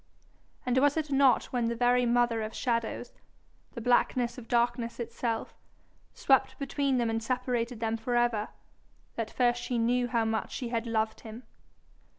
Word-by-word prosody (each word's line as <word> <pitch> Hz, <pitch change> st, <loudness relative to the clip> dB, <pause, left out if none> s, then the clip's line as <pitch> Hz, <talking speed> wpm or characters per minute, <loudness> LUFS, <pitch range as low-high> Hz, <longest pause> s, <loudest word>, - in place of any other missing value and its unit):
And 250 Hz, 0 st, +2 dB
was 285 Hz, +2 st, +3 dB
it 305 Hz, -2 st, -2 dB
not 270 Hz, -1 st, +4 dB
when 245 Hz, -2 st, +1 dB
the 235 Hz, 0 st, -1 dB
very 245 Hz, +1 st, +3 dB
mother 240 Hz, -1 st, +2 dB
of 215 Hz, 0 st, -5 dB
shadows, 235 Hz, -1 st, -2 dB, 0.6 s
the 235 Hz, -, -6 dB
blackness 245 Hz, +1 st, +1 dB
of 230 Hz, -, -12 dB
darkness 240 Hz, 0 st, 0 dB
itself, 230 Hz, -1 st, -3 dB, 0.6 s
swept 265 Hz, -1 st, +2 dB
between 275 Hz, -1 st, 0 dB
them 235 Hz, -2 st, +1 dB
and 225 Hz, 0 st, -1 dB
separated 245 Hz, -1 st, -2 dB
them 225 Hz, 0 st, 0 dB
for 240 Hz, +2 st, -2 dB
ever, 240 Hz, -3 st, +1 dB, 0.6 s
that 225 Hz, -1 st, -3 dB
first 240 Hz, 0 st, +1 dB
she 245 Hz, 0 st, -2 dB
knew 245 Hz, +2 st, +1 dB
how 230 Hz, -2 st, +1 dB
much 220 Hz, 0 st, -2 dB
she 245 Hz, -3 st, -4 dB
had 230 Hz, 0 st, -2 dB
loved 220 Hz, -1 st, -1 dB
him? 225 Hz, +2 st, -10 dB
240 Hz, 160 wpm, -29 LUFS, 230-250 Hz, 0.6 s, not